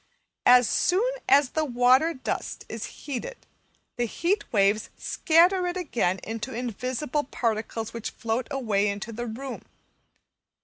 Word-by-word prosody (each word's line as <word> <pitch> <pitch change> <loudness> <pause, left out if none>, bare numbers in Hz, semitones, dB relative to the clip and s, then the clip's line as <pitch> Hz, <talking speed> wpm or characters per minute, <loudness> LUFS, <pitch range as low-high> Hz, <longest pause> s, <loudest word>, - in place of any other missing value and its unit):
As 250 -1 +7
soon 425 +8 +2 0.2
as 275 -1 +5
the 315 - 0
water 255 +4 +3
dust 260 - -4
is - - -5
heated 295 - -7 0.5
the 240 - +1
heat 365 - -1
waves 205 0 +2
scatter 355 +3 +3
it 355 +1 -2
again 230 - 0
into 225 +3 -5
invisible 255 +5 -2
particles, 225 -2 -2
which 230 -2 -4
float 230 +1 -3
away 220 -8 0
into 200 +2 -3
the 240 +2 -5
room. 255 +4 -6
250 Hz, 130 wpm, -26 LUFS, 225-300 Hz, 0.5 s, As